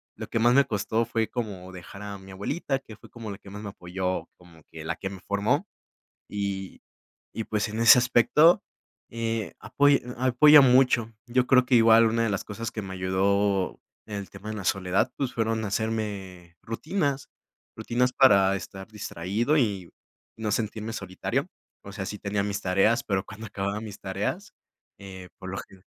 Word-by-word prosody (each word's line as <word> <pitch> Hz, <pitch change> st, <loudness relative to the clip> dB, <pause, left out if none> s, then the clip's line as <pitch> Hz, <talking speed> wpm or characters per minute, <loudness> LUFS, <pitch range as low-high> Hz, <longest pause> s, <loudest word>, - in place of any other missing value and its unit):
lo -, -, -7 dB
que 115 Hz, -, -1 dB
más 120 Hz, +3 st, +4 dB
me 140 Hz, -, +6 dB
costó, 110 Hz, +2 st, -1 dB
fue 115 Hz, -1 st, -1 dB
como 100 Hz, -7 st, -5 dB
dejar 90 Hz, +2 st, -11 dB
a 100 Hz, -1 st, -6 dB
mi 95 Hz, 0 st, -13 dB
abuelita, 135 Hz, -, -2 dB
que 115 Hz, -5 st, -13 dB
fue -, -, -17 dB
como 115 Hz, -3 st, -8 dB
la 100 Hz, -, -6 dB
que 100 Hz, -, -15 dB
más 105 Hz, +1 st, -8 dB
me 105 Hz, -, -6 dB
apoyó, 90 Hz, 0 st, -4 dB
como 85 Hz, -3 st, -19 dB
que 80 Hz, -1 st, -8 dB
la 85 Hz, +2 st, -3 dB
que 95 Hz, -, -5 dB
me 95 Hz, -1 st, -9 dB
formó. 115 Hz, -, 0 dB, 0.6 s
Y 100 Hz, -2 st, -4 dB, 0.5 s
y 115 Hz, -, -4 dB
pues, 105 Hz, 0 st, -1 dB
en 110 Hz, +2 st, -4 dB
ese 115 Hz, +1 st, +9 dB
aspecto, 125 Hz, +7 st, +4 dB, 0.5 s
eh, 115 Hz, -2 st, -3 dB
apoy 145 Hz, -1 st, +3 dB
apoya 130 Hz, +5 st, +7 dB
mucho. 125 Hz, -3 st, +4 dB
Yo 125 Hz, +1 st, +1 dB
creo 130 Hz, -1 st, +5 dB
que 125 Hz, -, +2 dB
igual, 115 Hz, 0 st, +7 dB
una 115 Hz, +1 st, +1 dB
de 110 Hz, -, 0 dB
las 95 Hz, -, -2 dB
cosas 110 Hz, +2 st, -5 dB
que 110 Hz, -, -5 dB
me 95 Hz, -1 st, -7 dB
ayudó, 95 Hz, +1 st, 0 dB, 0.3 s
en 105 Hz, -, -6 dB
el 100 Hz, -1 st, -6 dB
tema 105 Hz, -, -10 dB
de 110 Hz, -, -4 dB
la 100 Hz, -, -6 dB
soledad, 95 Hz, 0 st, +1 dB
pues, 135 Hz, -3 st, -3 dB
fueron 115 Hz, -1 st, 0 dB
hacerme 100 Hz, -5 st, -4 dB
rutinas. 140 Hz, -, -2 dB, 0.5 s
Rutinas 125 Hz, +1 st, 0 dB
para 100 Hz, -8 st, +5 dB
estar 95 Hz, +1 st, -9 dB
distraído 105 Hz, -, -1 dB
y, 100 Hz, -, 0 dB, 0.4 s
no 110 Hz, -1 st, -3 dB
sentirme 110 Hz, +1 st, -2 dB
solitario. 110 Hz, -, -3 dB, 0.4 s
O 100 Hz, -, -10 dB
sea, 95 Hz, -1 st, -5 dB
sí 105 Hz, -, -5 dB
tenía 100 Hz, 0 st, -1 dB
mis 100 Hz, 0 st, -2 dB
tareas, 105 Hz, +6 st, +2 dB
pero 95 Hz, -2 st, -1 dB
cuando 110 Hz, +2 st, -9 dB
acababa 100 Hz, +1 st, -3 dB
mis 105 Hz, -2 st, -9 dB
tareas, 100 Hz, -, -4 dB, 0.5 s
eh, 95 Hz, -2 st, -10 dB
por 95 Hz, -, -8 dB
lo 95 Hz, -, -4 dB
gene 95 Hz, -1 st, -11 dB
105 Hz, 185 wpm, -26 LUFS, 95-115 Hz, 0.6 s, ese